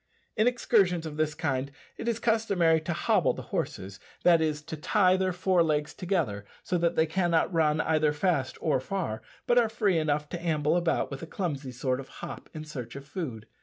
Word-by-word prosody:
In 215 - +3
excursions 195 -8 +2
of 150 -1 -6
this 155 -1 0
kind 140 -4 -1 0.3
it - - -6
is 235 -2 +1
customary 200 -9 +2
to 170 +2 -3
"hobble" 165 - +2
the - - -7
horses 95 +1 -3 0.2
that 170 -2 +6
is, 155 -2 -1
to 160 +1 -6
tie 185 +4 +3
their 190 0 +1
fore 180 0 +2
legs 150 -2 0
together, 170 - -1 0.2
so 180 - 0
that 170 0 +1
they 160 - +4
cannot 170 +1 +1
run 155 -2 +2
either 155 -1 +2
fast 150 -3 0
or 150 -5 +2
far, 130 - -3 0.2
but 245 0 +4
are 230 -2 +2
free 210 -6 +1
enough 150 -1 0
to 175 - -5
amble 155 -2 +1
about 170 -4 +1
with 135 - -6
a 165 - -6
clumsy 150 -9 -3
sort 130 +1 -1
of 135 - -8
hop - - -9
in 155 - -7
search 125 -6 -7
of 140 0 -8
food. 140 - -5
160 Hz, 205 wpm, -28 LUFS, 150-185 Hz, 0.3 s, that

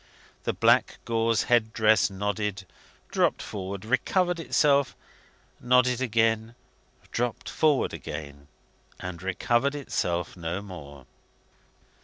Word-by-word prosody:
The - - 0
black - - +3
gauze 115 -1 +1
head 115 -2 +2
dress 110 -2 +4
nodded, 100 0 -3 0.5
dropped - - +1
forward, 100 0 -6
recovered 175 - +1
itself, 140 -4 +2 0.6
nodded 125 0 +3
again, 115 -1 +1 0.6
dropped 120 -1 -2
forward 150 -4 +2
again, 70 -2 -7 0.5
and 90 -1 -6
recovered 120 +8 0
itself 90 - -2
no 85 +1 -3
more. 70 -9 -10
110 Hz, 100 wpm, -27 LUFS, 95-125 Hz, 0.6 s, dress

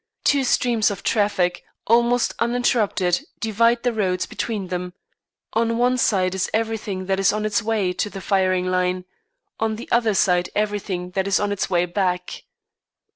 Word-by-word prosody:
Two 280 -2 +3
streams 235 -3 +2
of 200 -1 -6
traffic, 200 -4 +1 0.2
almost 240 +2 +3
uninterrupted, 230 -4 +1
divide 230 +2 +2
the 245 -1 +1
roads 185 -4 0
between 205 -6 -4
them; 180 0 -4 0.6
on 230 0 +1
one 250 +1 +3
side 190 -7 +1
is 190 -1 -1
everything 220 -4 -2
that 190 0 0
is 195 - +4
on 215 0 -2
its 215 +1 +1
way 215 -5 0
to 210 - -2
the 195 - -8
firing 185 -1 +1
line; 180 0 0 0.5
on 220 0 0
the 230 - -8
other 230 -3 +2
side 180 -2 +2
everything 205 -4 -2
that 190 +1 -1
is 200 - +2
on 205 0 -1
its 205 - -2
way 175 -1 +2
back. 180 0 -2
205 Hz, 165 wpm, -22 LUFS, 185-225 Hz, 0.6 s, is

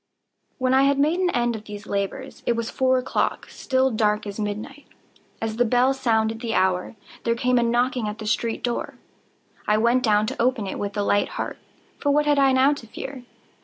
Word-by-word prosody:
When 255 -1 +1
I 265 - +5
had 280 0 +3
made 305 +5 +2
an 370 -1 +2
end 240 -5 0
of 215 -1 -8
these 205 -1 -8
labors, 200 +7 -4
it 240 - +4
was 230 0 -3
four 260 0 +2
o'clock—still 260 +1 0
dark 210 -1 +1
as 205 +1 -6
midnight. 215 +7 -5 0.5
As 220 0 -3
the 245 - +4
bell 245 +3 +3
sounded 225 -4 0
the 230 -2 -2
hour, 185 +2 +1 0.3
there 230 0 +1
came 250 +1 +2
a - - +2
knocking 240 0 +1
at 210 +1 -4
the 220 - -7
street 225 +1 -1
door. 240 -1 -2 0.7
I 210 - +3
went 235 +3 +3
down 215 -3 +3
to 255 +3 -3
open 245 -3 +1
it 190 - -5
with 200 +1 -4
a 205 - +1
light 205 0 +2
heart,—for 285 - -6
what 295 +1 +3
had 290 -1 +3
I 270 -1 +5
now 265 +2 +4
to 265 -6 -9
fear? 255 +3 -8
235 Hz, 200 wpm, -24 LUFS, 215-260 Hz, 0.7 s, I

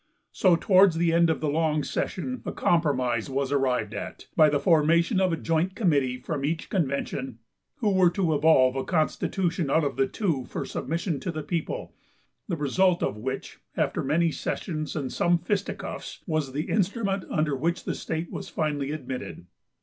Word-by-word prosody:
So 185 -3 +4
towards 185 0 +5
the 165 0 +2
end 170 0 +4
of 160 - 0
the 155 - 0
long 155 0 +1
session 255 +7 -3
a - - -3
compromise 130 -8 +1
was 135 0 -1
arrived 125 -6 +1
at, - - -6
by 155 -2 +6
the 145 -1 +1
formation 170 +5 +3
of 185 -1 +2
a 165 - 0
joint 165 +4 0
committee 140 - +1
from 140 +2 -4
each 155 +3 -2
convention, 140 - -2 0.4
who 215 -4 0
were 185 -2 +5
to 175 -2 0
evolve 145 -4 +4
a 135 - -1
constitution 170 0 0
out 160 +3 +3
of 140 -2 -2
the 135 - +3
two 160 - -1
for - - -5
submission 165 0 -2
to 180 - -3
the 155 -2 -5
people; 165 +1 -3 0.5
the 175 -5 -2
result 175 +5 +2
of - - -1
which, 130 +5 -5 0.2
after - - 0
many 160 +4 +2
sessions, 155 -1 -4
and 140 -4 -3
some 175 0 +3
fisticuffs, 195 +4 -4
was 155 -6 -1
the 150 +4 -3
instrument 200 -1 0
under 155 -3 0
which 170 +6 -1
the - - -2
state 160 +1 -4
was - - -6
finally 145 -3 -1
admitted. 130 - -6
155 Hz, 175 wpm, -26 LUFS, 140-175 Hz, 0.5 s, by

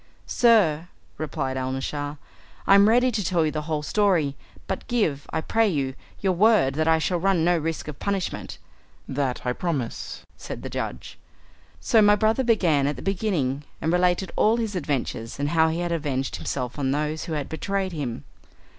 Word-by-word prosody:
"Sir," 185 -10 +3 0.3
replied 145 -4 -3
Alnaschar, 135 +3 -3 0.5
"I - - +5
am 200 +1 +7
ready 245 +2 +4
to 215 -3 -1
tell 170 -2 +1
you 155 - 0
the 155 - -3
whole 150 -1 -1
story, 170 -6 +2 0.3
but - - -4
give, 160 - 0
I - - -1
pray 225 +7 +2
you, 140 -8 -1 0.3
your 190 -2 +2
word, 205 -7 +4
that 155 +2 0
I 160 0 +5
shall 175 +2 0
run 185 -2 +2
no 175 0 +4
risk 165 -1 -3
of 150 -2 -7
punishment." 200 -2 -3 0.5
"That 130 -2 -2
I 125 - +1
promise," 140 -7 -4
said - - -8
the - - -6
judge. - - -5 0.6
So 225 - +4
my 205 0 +6
brother 220 +5 +2
began 175 - +3
at 145 - -1
the - - -9
beginning 175 -9 -1 0.2
and 160 +2 0
related 180 +1 +2
all 220 +2 +3
his 220 -4 -2
adventures, 140 -8 -3
and 145 0 0
how 160 0 +3
he 165 +2 -2
had 175 -1 -2
avenged 145 -5 -2
himself 125 +1 -4
on 135 -2 0
those 150 +3 -1
who 165 - -4
had 145 -3 -2
betrayed 195 +3 -2
him. 135 - -4
160 Hz, 180 wpm, -25 LUFS, 145-195 Hz, 0.6 s, am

